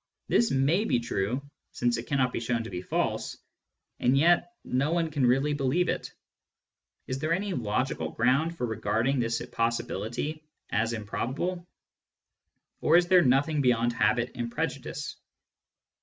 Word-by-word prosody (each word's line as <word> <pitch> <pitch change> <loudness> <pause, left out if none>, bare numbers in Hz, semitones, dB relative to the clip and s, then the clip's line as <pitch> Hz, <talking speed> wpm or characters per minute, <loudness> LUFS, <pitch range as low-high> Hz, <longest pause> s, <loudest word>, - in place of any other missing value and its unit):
This 235 - +3
may 145 +9 +2
be 125 - +2
true, 120 +4 -2 0.3
since 120 -1 +1
it 115 - -6
cannot 130 -3 +1
be - - -1
shown 115 0 -1
to 115 - -8
be 90 -1 -4
false, - - -2 0.6
yet 160 - +3
no 140 +5 0
one 165 -2 0
can 140 -4 +2
really 135 +4 +2
believe 145 +5 +1
it. - - -3 0.9
Is 130 +1 -3
there 155 +3 -1
any 195 +2 -1
logical 110 - -1
ground 135 - +1
for 125 - -1
regarding 115 +3 0
this 115 -1 -1
possibility 115 +5 -2 0.3
as 110 +2 +1
improbable 140 - -3 0.6
} - - -53
Or 160 +2 +5
is 175 0 +2
there 185 -1 +7
nothing 145 +2 +2
beyond 120 -2 +2
habit 120 0 +1
and 120 -2 -4
prejudice - - -4
130 Hz, 145 wpm, -28 LUFS, 115-155 Hz, 0.9 s, there